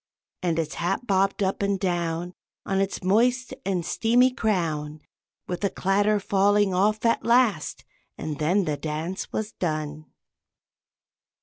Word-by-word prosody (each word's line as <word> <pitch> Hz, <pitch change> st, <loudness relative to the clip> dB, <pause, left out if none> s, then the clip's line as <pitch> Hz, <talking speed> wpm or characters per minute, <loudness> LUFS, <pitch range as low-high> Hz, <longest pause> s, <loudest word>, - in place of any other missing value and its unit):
And 170 Hz, -3 st, 0 dB
its 160 Hz, -2 st, -1 dB
hat 175 Hz, +8 st, -2 dB
bobbed 195 Hz, -1 st, +1 dB
up 190 Hz, +1 st, -1 dB
and 200 Hz, -1 st, 0 dB
down 175 Hz, -2 st, -2 dB, 0.3 s
On 195 Hz, 0 st, 0 dB
its 195 Hz, -1 st, -2 dB
moist 245 Hz, +6 st, +2 dB
and 180 Hz, -3 st, -1 dB
steamy 245 Hz, +6 st, +3 dB
crown, 160 Hz, -, -1 dB, 0.5 s
With 180 Hz, +2 st, -5 dB
a 200 Hz, -, +3 dB
clatter 205 Hz, +3 st, +1 dB
falling 200 Hz, 0 st, +2 dB
off 210 Hz, +4 st, +1 dB
at 230 Hz, -, +2 dB
last, 235 Hz, -9 st, +2 dB, 0.3 s
and 155 Hz, -2 st, -5 dB
then 180 Hz, +6 st, +2 dB
the 150 Hz, -2 st, -1 dB
dance 160 Hz, +5 st, -4 dB
was 215 Hz, 0 st, -3 dB
done. 155 Hz, -2 st, -3 dB
190 Hz, 135 wpm, -25 LUFS, 165-210 Hz, 0.5 s, steamy